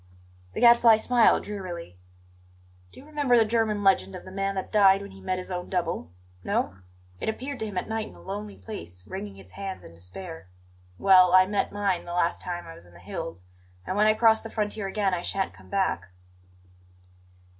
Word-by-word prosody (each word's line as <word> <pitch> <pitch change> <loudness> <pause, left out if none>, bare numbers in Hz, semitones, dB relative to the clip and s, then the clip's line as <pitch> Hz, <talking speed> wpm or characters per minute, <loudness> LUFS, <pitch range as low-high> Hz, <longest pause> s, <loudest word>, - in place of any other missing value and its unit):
The - - -4
Gadfly 235 -2 +7
smiled 235 +1 +4
drearily. 175 - -7 0.9
"Do - - -14
you 275 - -14
remember 290 -5 +2
the 225 - +5
German 215 -2 +1
legend 195 0 +3
of 180 - -9
the 185 - -10
man 195 +1 -2
that 190 - -4
died 195 -2 +5
when 200 - -9
he 195 - -14
met 185 0 -1
his 185 +1 -6
own 180 -1 -4
Double? 170 - -2 0.3
No? 95 - -1 0.4
It - - -2
appeared 260 +5 -5
to 220 - -2
him 200 -3 -6
at 180 - -2
night 220 -1 -2
in - - -14
a - - -15
lonely 205 +1 -6
place, 90 - -9
wringing 100 -2 -7
its 95 -1 -14
hands 195 - -6
in 85 - -13
despair. 95 - -9 0.5
Well, 185 - +6
I 185 0 +8
met 200 +1 -1
mine 200 -3 -1
the 175 - -6
last 175 -1 +1
time 175 -1 -5
I 165 - -9
was 85 - -14
in 85 - -19
the - - -14
hills; 85 0 -6 0.4
and 185 - -3
when 210 +1 +4
I 215 - +4
cross 220 0 +4
the 225 - -8
frontier 210 -2 -2
again 195 -1 0
I 175 - -1
shan't 195 +1 -2
come - - -17
back." 190 - 0
195 Hz, 205 wpm, -26 LUFS, 175-215 Hz, 0.9 s, I